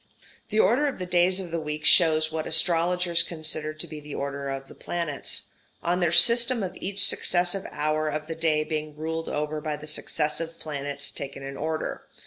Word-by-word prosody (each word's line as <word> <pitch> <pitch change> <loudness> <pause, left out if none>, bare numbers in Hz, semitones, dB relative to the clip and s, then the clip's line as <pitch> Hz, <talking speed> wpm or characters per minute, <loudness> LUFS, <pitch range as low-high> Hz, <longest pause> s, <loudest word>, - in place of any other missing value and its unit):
The 215 - 0
order 260 +7 +3
of 280 - -4
the 185 - -5
days 180 +1 +2
of 180 -3 -7
the 165 - -2
week 150 -1 -5
shows 155 -2 +5
what 160 0 -4
astrologers 175 0 +3
considered 155 -2 -2
to - - -1
be 155 - -8
the 150 -1 -9
order 140 0 -4
of 135 0 -5
the - - -13
planets; 165 -5 -3 0.3
on 175 +1 0
their 175 -3 +1
system 235 +4 +6
of 185 -1 -5
each 200 +1 +4
successive 180 +2 +2
hour 155 0 -1
of 150 0 -4
the 165 - -5
day 160 -2 +1
being 155 -1 -5
ruled 160 +1 -4
over 150 +1 -3
by 150 0 -3
the 150 - -10
successive 155 +2 -2
planets 140 -2 -5
taken 140 0 -8
in 135 0 -7
order. 155 +2 -4
155 Hz, 190 wpm, -25 LUFS, 150-175 Hz, 0.3 s, system